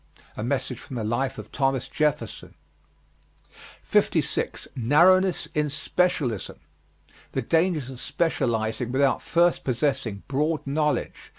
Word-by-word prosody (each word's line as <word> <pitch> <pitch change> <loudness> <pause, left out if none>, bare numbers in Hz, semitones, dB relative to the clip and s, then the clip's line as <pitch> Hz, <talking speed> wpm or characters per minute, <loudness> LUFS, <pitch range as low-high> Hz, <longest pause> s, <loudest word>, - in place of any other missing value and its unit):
A 105 - -4
message 130 -1 -2
from 130 - -9
the 115 - -2
life 120 +5 -1
of - - -9
Thomas 135 -2 0
Jefferson. 150 -2 -2 1.3
56. - - 0
NARROWNESS 175 +9 +4
IN 150 -1 +1
SPECIALISM. 150 - -1 0.7
The 135 - -1
dangers 160 -2 +1
of 130 - -10
specializing 120 -7 -1
without 135 -1 +2
first 170 +1 +2
possessing 130 -5 -1
broad 150 +3 0
knowledge. 150 +2 -1
135 Hz, 110 wpm, -25 LUFS, 125-155 Hz, 1.3 s, NARROWNESS